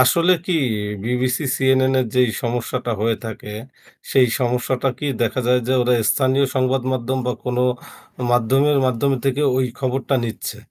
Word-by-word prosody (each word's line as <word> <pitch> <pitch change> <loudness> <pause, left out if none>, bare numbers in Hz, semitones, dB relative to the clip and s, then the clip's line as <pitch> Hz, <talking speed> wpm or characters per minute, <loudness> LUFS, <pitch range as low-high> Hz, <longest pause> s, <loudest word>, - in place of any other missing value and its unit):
আসলে 170 +8 +4
কি 185 - 0 0.5
BBC, 125 +4 0
CNA 130 0 +3
এর 125 - -1
যেই 125 -1 +4
সমস্যাটা 120 0 -2
হয়ে 115 +1 +1
থাকে 110 -1 -7 0.6
সেই 130 -2 +5
সমস্যাটা 125 +1 0
কি 145 - -4 0.2
দেখা 120 +3 0
যায় 125 0 +4
যে 130 - +1
ওরা 125 0 +2 0.2
স্থানীয় 135 0 +2
সংবাদ 130 0 +1
মাধ্যম 130 +1 -1
বা 125 - +1
কোনো 125 0 0 0.7
মাধ্যমের 135 +5 +3
মাধ্যম 130 +2 +1
থেকে 135 +2 +1
ওই 130 - +2
খবরটা 135 +1 -1
নিচ্ছে 115 - -5
130 Hz, 150 wpm, -20 LUFS, 125-135 Hz, 0.7 s, সেই